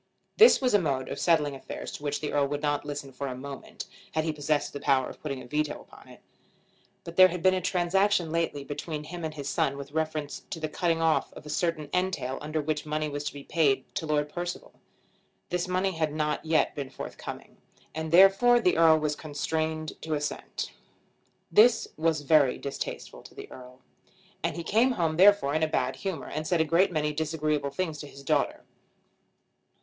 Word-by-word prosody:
This 455 +2 +8
was 255 -3 +1
a 205 - +6
mode 135 -6 -1
of - - -5
settling 155 -4 +2
affairs 135 - -7
to - - -8
which 145 -1 -2
the 150 - -3
Earl 145 -1 +2
would 145 +1 -4
not 145 -1 0
listen 145 -2 -5
for 140 +2 -4
a 130 - -4
moment, 140 +1 -8 0.3
had 155 - +1
he 160 -1 -1
possessed 145 0 -1
the 140 - -5
power 135 -2 +2
of - - -11
putting 140 -4 -5
a - - -11
veto 150 +3 -2
upon - - -16
it. - - -16 0.8
But 170 - -9
there 185 0 +10
had 180 -1 -5
been 185 0 +5
a 185 - 0
transaction 180 0 +1
lately 165 -4 -1
between 150 +2 -5
him 175 +2 -7
and 155 -1 -4
his 140 -2 -6
son 140 -1 0
with 140 0 -8
reference 155 -1 -2
to 165 - -5
the 155 - -2
cutting 165 +1 0
off 160 -1 +2
a 150 - -11
certain 160 -1 -1
entail 180 -8 -1
under 155 +1 -2
which 150 0 -2
money 155 0 -2
was 145 0 -4
to - - -3
be 140 - -8
paid 140 -5 +1
to 160 - -3
Lord 150 -1 +1
Percival. 175 +3 -6 0.8
This 180 0 -1
money 185 +1 0
had 160 -3 -1
not 150 0 -1
yet 160 -1 +2
been 140 -2 -5
forthcoming, - - -8 0.4
and 160 0 -4
therefore 195 +7 +6
the 180 -7 +2
Earl 165 -1 +6
was 150 -1 -1
constrained 155 +1 -3
to 160 -1 -2
assent. 150 0 -4 0.8
This 225 +1 +5
was 160 -1 +1
very 145 -2 +4
distasteful 140 - -6
to - - -15
the - - -10
Earl, 125 0 -12 0.6
and - - -1
he 170 - -5
came 230 +9 +3
home 160 -6 0
therefore 195 -6 +5
in 155 - +1
a 160 - +3
bad 130 -4 -1
humour, 190 -7 -4
and 155 +1 -4
said 175 - +1
a 160 - +3
great 175 +5 +3
many 150 -2 0
disagreeable 155 -2 -1
things 155 +1 -3
to 145 - -7
his 140 0 -13
daughter. - - 0
155 Hz, 200 wpm, -28 LUFS, 145-170 Hz, 0.8 s, there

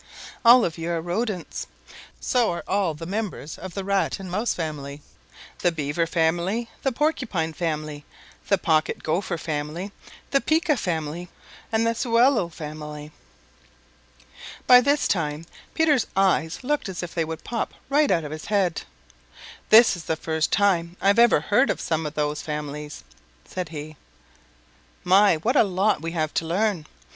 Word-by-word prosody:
All 240 +1 +8
of 165 -1 -4
you 165 +1 -3
are 170 -1 0
Rodents. 180 - -3 0.5
So 245 -3 +1
are 170 - -3
all 190 -5 0
the 165 +2 -8
members 195 -5 -4
of 185 -1 -8
the 195 - -3
Rat 200 +1 0
and 190 -2 -7
Mouse 210 +6 0
family, 145 -3 -5 0.6
the 175 - +2
Beaver 160 +1 -1
family, 175 +8 0
the 270 - 0
Porcupine 235 - -1
family, 155 -3 -3 0.4
the 200 - +3
Pocket 160 -3 0
Gopher 170 +2 -1
family, 160 +5 -4 0.4
the 275 - +3
Pika 315 -1 +2
family, 170 - -3 0.4
and 225 0 +2
the 230 - +2
Sewellel 230 -4 +3
family." 150 -1 -8 1.5
By 250 0 +8
this 285 +3 +2
time 155 -3 -1 0.3
Peter's 300 -6 +3
eyes 185 -1 +1
looked 290 -5 -1
as 185 -1 -5
if 175 - -6
they 165 - 0
would 160 0 -6
pop 235 -2 -3 0.2
right 290 +1 +3
out 170 -3 +2
of 150 - -6
his 155 0 -7
head. 195 -5 +1 0.9
"This 225 -1 +7
is 170 - -9
the 160 - 0
first 160 0 -1
time 180 -4 +1
I've 200 +3 +3
ever 235 -10 +5
heard 210 - +2
of - - -1
some 160 -1 -1
of 150 - -8
those 150 0 -1
families," 150 -1 -6 0.4
said 180 -3 -5
he. 155 -1 -8 1.1
"My, 195 0 +5
what 235 - 0
a - - +6
lot 195 -2 +1
we 165 0 -4
have 155 -3 -1
to 165 - -1
learn! 185 -2 0
175 Hz, 160 wpm, -24 LUFS, 155-215 Hz, 1.5 s, All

